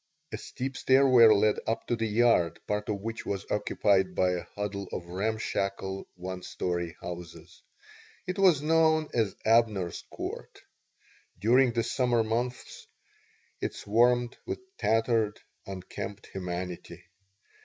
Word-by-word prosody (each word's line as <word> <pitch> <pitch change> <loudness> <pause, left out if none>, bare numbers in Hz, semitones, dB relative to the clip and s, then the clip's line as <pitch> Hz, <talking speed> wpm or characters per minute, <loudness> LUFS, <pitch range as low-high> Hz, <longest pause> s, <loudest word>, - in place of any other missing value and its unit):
A - - -3
steep 135 +1 -5
stairway 130 -3 +6
led 110 0 +4
up 115 - -1
to 120 - 0
the 115 -1 -1
yard, 110 -6 +3
part 105 +1 -2
of 100 -2 -2
which 115 +2 -5
was 100 -1 -3
occupied 100 -3 +1
by 90 0 +3
a 90 -1 -3
huddle 100 -1 -4
of 85 - -5
ramshackle 100 0 -2
one 90 0 -6
story 85 -1 -3
houses. 85 -1 -9 0.6
It 185 +2 -4
was 175 -7 +5
known 160 0 +3
as 110 -5 0
Abner's 110 -6 +2
Court. - - -7 0.8
During 120 +5 +4
the 115 0 +1
summer 120 -1 +1
months 120 +3 -3 0.7
it - - -2
swarmed 120 +3 +2
with 375 0 -2 0.2
tattered, 115 -2 +1 0.3
unkempt 95 +1 -7
humanity. 90 -1 -5
110 Hz, 125 wpm, -29 LUFS, 95-120 Hz, 0.8 s, stairway